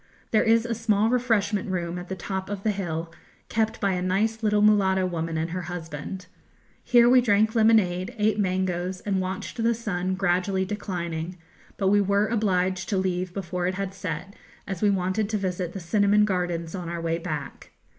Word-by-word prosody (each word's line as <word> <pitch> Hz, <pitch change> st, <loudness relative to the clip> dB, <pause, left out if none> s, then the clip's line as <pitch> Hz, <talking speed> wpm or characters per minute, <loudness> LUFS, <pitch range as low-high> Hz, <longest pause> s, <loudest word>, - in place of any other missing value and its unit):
There 220 Hz, -, +4 dB
is 225 Hz, 0 st, +3 dB
a 235 Hz, -, -1 dB
small 220 Hz, -1 st, +1 dB
refreshment 215 Hz, -5 st, +1 dB
room 175 Hz, -1 st, -2 dB
at 180 Hz, -, -9 dB
the 190 Hz, -, -3 dB
top 190 Hz, +1 st, -4 dB
of 200 Hz, -1 st, -5 dB
the 215 Hz, -, +2 dB
hill, 165 Hz, -4 st, -4 dB, 0.4 s
kept 220 Hz, 0 st, 0 dB
by 200 Hz, -1 st, +1 dB
a 180 Hz, -1 st, -1 dB
nice 210 Hz, +5 st, 0 dB
little 210 Hz, -1 st, +2 dB
mulatto 190 Hz, -3 st, +4 dB
woman 165 Hz, -2 st, -2 dB
and 165 Hz, +1 st, -2 dB
her 180 Hz, +1 st, -3 dB
husband. 170 Hz, +1 st, -6 dB, 0.6 s
Here 240 Hz, -1 st, +5 dB
we 250 Hz, +1 st, +6 dB
drank 215 Hz, -1 st, +3 dB
lemonade, 215 Hz, -3 st, +3 dB
ate 210 Hz, 0 st, +1 dB
mangoes, 185 Hz, -1 st, -1 dB
and 195 Hz, -2 st, 0 dB
watched 185 Hz, +5 st, -4 dB
the 230 Hz, +1 st, +2 dB
sun 185 Hz, -5 st, -2 dB
gradually 190 Hz, 0 st, +1 dB
declining, 180 Hz, -4 st, -4 dB, 0.4 s
but 195 Hz, -2 st, +2 dB
we 205 Hz, +1 st, +4 dB
were 200 Hz, +1 st, +2 dB
obliged 190 Hz, -5 st, 0 dB
to 200 Hz, -, +1 dB
leave 185 Hz, -1 st, -1 dB
before 180 Hz, -1 st, -3 dB
it 185 Hz, -, -1 dB
had 195 Hz, 0 st, -3 dB
set, 195 Hz, 0 st, -5 dB, 0.3 s
as 190 Hz, -3 st, -5 dB
we 210 Hz, -, +4 dB
wanted 195 Hz, +2 st, 0 dB
to 215 Hz, -, 0 dB
visit 180 Hz, -3 st, -3 dB
the 195 Hz, -, -5 dB
cinnamon 205 Hz, +3 st, +3 dB
gardens 175 Hz, -4 st, -2 dB
on 180 Hz, -3 st, -5 dB
our 170 Hz, 0 st, -3 dB
way 165 Hz, 0 st, -1 dB
back. 155 Hz, -5 st, -6 dB
190 Hz, 185 wpm, -25 LUFS, 180-210 Hz, 0.6 s, we